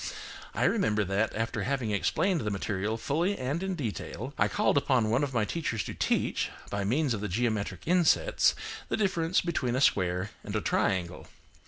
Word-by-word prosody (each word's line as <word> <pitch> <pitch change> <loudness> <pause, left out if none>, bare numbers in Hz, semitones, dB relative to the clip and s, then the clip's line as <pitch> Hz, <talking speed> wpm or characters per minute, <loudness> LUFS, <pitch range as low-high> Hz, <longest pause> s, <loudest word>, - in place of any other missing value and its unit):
I - - +1
remember 105 -1 +2
that, 100 +3 0
after 115 +1 -2
having 130 -5 -1
explained 170 - +1
the 105 - -1
material 100 +2 -2
fully 170 - 0
and 140 +7 -2
in 190 -1 -2
detail, 130 - -5
I - - +3
called 210 -5 +1
upon 130 -6 +2
one 125 +5 +2
of 135 -3 -3
my 115 -2 +2
teachers 120 -7 -2
to - - -6
teach, - - 0 0.2
by 100 -1 -1
means 130 +6 +1
of 105 - -3
the 105 - -2
geometric 105 -3 -1
insets, 180 - +3 0.3
the - - 0
difference 185 -4 +1
between 135 -8 -1
a - - +1
square 90 -4 +2
and 105 - -5
a 105 - +1
triangle. 90 -4 0
120 Hz, 180 wpm, -29 LUFS, 105-155 Hz, 0.3 s, I